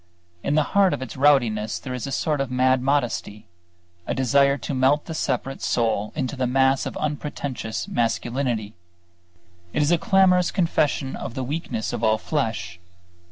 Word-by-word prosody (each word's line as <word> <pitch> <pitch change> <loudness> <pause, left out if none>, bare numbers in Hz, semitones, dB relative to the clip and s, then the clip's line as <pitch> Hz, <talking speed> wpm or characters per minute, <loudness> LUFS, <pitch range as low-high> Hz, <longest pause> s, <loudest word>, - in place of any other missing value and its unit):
In 140 - 0
the 155 - +4
heart 195 -5 +4
of 130 - -6
its 130 - -8
rowdiness 120 -7 +2
there 130 - -6
is 125 +1 -4
a - - -5
sort 150 +1 0
of 135 - -2
mad 130 0 +2
modesty; 125 -6 -1 0.6
a - - -1
desire 140 +2 +3
to 140 - -5
melt 135 +3 +2
the 165 - -6
separate 135 -3 -2
soul 110 -3 0
into 135 -2 -2
the 130 -1 -1
mass 135 +1 +2
of - - -6
unpretentious 145 -6 -4
masculinity. 120 -1 -1 1.0
It 150 - +2
is 145 - +2
a 175 - +3
clamorous 190 -5 +4
confession 150 -6 0
of 130 - -6
the 130 - -2
weakness 140 -5 -3
of - - -4
all 110 0 +3
flesh. 110 - -3
135 Hz, 165 wpm, -23 LUFS, 120-145 Hz, 1.0 s, the